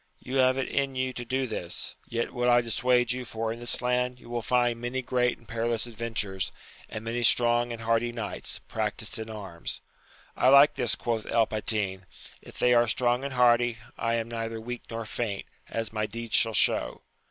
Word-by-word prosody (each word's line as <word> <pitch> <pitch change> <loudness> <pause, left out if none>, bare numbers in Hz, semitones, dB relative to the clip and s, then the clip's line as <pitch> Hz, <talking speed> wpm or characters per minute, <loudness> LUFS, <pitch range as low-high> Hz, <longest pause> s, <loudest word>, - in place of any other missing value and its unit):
You 130 +2 -3
have 130 0 +4
it 135 - -1
in 135 -1 -1
you 130 0 -1
to 120 - -5
do 130 +2 -1
this; 105 -7 -4
yet 115 0 -2
would 125 0 +1
I 120 0 +6
dissuade 120 +1 +2
you^^for 115 -2 -2
in 115 - -10
this 120 +1 -4
land 125 0 0
you 120 - -13
will 120 -1 -1
find 120 0 +1
many 125 +2 -2
great 125 -1 +1
and 115 - -22
perilous 115 0 0
adven 115 -1 -6
tures, 95 -3 -1 0.4
and 110 +1 -6
many 115 +1 -1
strong 120 0 +3
and 115 -1 -6
hardy 115 +1 +1
knights, 115 -3 -4
practised - - -2
in 110 0 -6
arms. 95 -6 -6 0.6
I 130 - +4
like 140 +2 +8
this, - - 0
quoth 115 -2 -2
El 115 -1 +3
Patin: 105 -3 -2 0.3
if - - -13
they 125 - +4
are 120 0 +5
strong 120 +2 +1
and 140 -1 -3
hardy, 120 -1 +4 0.2
I 115 0 0
am 115 -1 -1
neither 115 -1 -4
weak 120 +2 -5
nor 115 -1 -4
faint, 105 -2 -3 0.2
as 115 -1 -3
my 105 -1 -1
deeds 115 +1 -7
shall 115 -1 +4
show. - - +3
120 Hz, 200 wpm, -28 LUFS, 115-125 Hz, 0.6 s, like